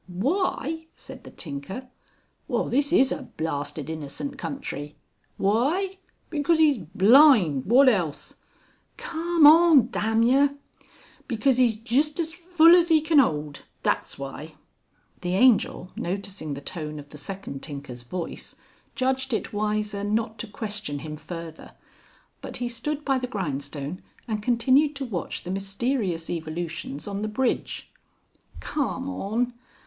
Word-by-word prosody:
"Why!" 320 - -1
said - - -11
the - - -9
tinker. 165 - -7 0.6
"Well 245 -6 0
this 280 +3 +1
is 265 0 +4
a - - -5
blasted 145 -2 -3
innocent 160 - -5
country! 150 - -6 0.4
Why! 310 - +1 0.3
Because 315 +2 +2
'E's 300 -4 +5
blind! 195 - +5
Wot 260 +5 +6
else? 165 - +1 0.6
(Carm 335 -1 +1
on 305 -5 +7
Dam 225 0 +1
yer). 275 +4 +4 0.7
Because 255 +2 +2
'E's 235 -3 +3
just 265 +8 0
as 325 -1 -1
full 340 -1 +6
as 350 -1 +4
'E 320 -1 +6
can 310 -1 +4
'old. 150 - 0 0.2
That's - - -1
why!" 145 +3 -8 0.7
The 180 0 -1
Angel 210 -5 +3
noticing 185 -5 -4
the 140 - -8
tone 155 0 -5
of 145 0 -10
the 150 - -11
second 145 -3 -7
tinker's 140 -5 -7
voice, 165 +8 -6 0.4
judged 260 -1 0
it 220 - -2
wiser 210 -1 -1
not 220 +1 -1
to - - -4
question 205 -8 -3
him 155 -1 -5
further. 165 0 -9 0.7
But - - -4
he 245 -1 -2
stood 295 +5 -4
by 270 -2 +2
the 250 - -3
grindstone 145 - -4 0.3
and 215 -2 -2
continued 260 +6 +3
to 275 -1 -4
watch 195 -9 -4
the 180 - -5
mysterious 195 -2 -1
evolutions 160 -2 -4
on 200 0 -4
the 215 - -1
bridge. 245 +4 -2 0.7
"Carm 275 -2 -2
on! 245 -1 -2
215 Hz, 135 wpm, -25 LUFS, 165-275 Hz, 0.7 s, on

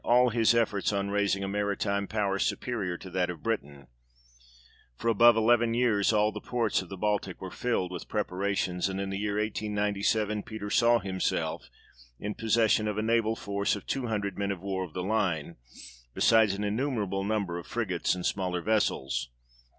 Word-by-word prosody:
all 125 +1 +5
his 115 0 +3
efforts 110 -4 +1
on 100 0 -1
raising 100 -1 +1
a - - -2
maritime 100 0 -1
power 100 -2 -1
superior 100 -8 -1
to 95 - -11
that 90 0 0
of 90 - -7
Britain: 70 -12 -3 1.1
for 115 - -1
above 115 +1 +6
eleven 115 +1 +3
years 115 -5 +3
all 105 0 +3
the - - -7
ports 115 -5 0
of 90 - -11
the 95 - -7
Baltic 105 -2 -1
were 95 -1 -7
filled 105 -7 -1
with 90 - -6
preparations, 95 -3 -1
and 95 0 -3
in 100 0 -3
the 95 - -3
year 105 0 -1
1897 105 0 0
Peter 105 -1 -7
saw 120 +1 +5
himself 95 -3 -2 0.5
in 105 +1 -3
possession 110 -1 +2
of 105 -1 -2
a 110 - 0
naval 115 0 +2
force 100 -1 -1
of 100 - -9
two 135 -3 -2
hundred 100 -3 -2
men 100 0 -1
of 100 -3 -2
war 95 -1 -2
of 85 -4 -9
the 90 - -3
line, 90 -6 -1 0.6
besides 110 -3 +4
an 100 - -4
innumerable 105 -3 -1
number 100 -4 -1
of 85 - -11
frigates 95 -7 -1
and 90 - -5
smaller 90 -3 -1
vessels. 65 - 0
100 Hz, 180 wpm, -29 LUFS, 95-110 Hz, 1.1 s, above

